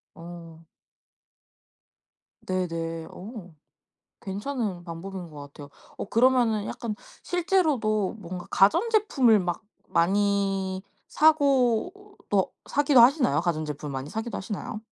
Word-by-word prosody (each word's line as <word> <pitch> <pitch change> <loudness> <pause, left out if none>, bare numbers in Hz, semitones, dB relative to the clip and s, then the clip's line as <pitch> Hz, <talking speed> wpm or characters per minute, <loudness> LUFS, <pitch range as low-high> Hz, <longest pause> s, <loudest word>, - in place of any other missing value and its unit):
어. 165 -1 -11 1.8
네네. 165 -3 -3
어. 190 -4 -10 0.7
괜찮은 205 -2 -3
방법인 175 +1 -7
것 150 - -10
같아요. 145 0 -11 0.3
어 - - -4
그러면은 235 -3 +3
약간 220 -3 -4 0.3
실제로도 285 - +1
뭔가 180 -1 -7
가전제품을 315 - +4
막 175 +2 -3 0.2
많이 195 +1 +1 0.2
사고 280 -2 +3 0.4
또 195 -2 +1 0.2
사기도 285 -3 +4
하시나요? 245 - +4
가전제품을 155 -4 -3
많이 135 +2 -5
사기도 225 +2 -4
하시나요? 210 +2 -5
200 Hz, 235 characters per minute, -26 LUFS, 170-245 Hz, 1.8 s, 가전제품을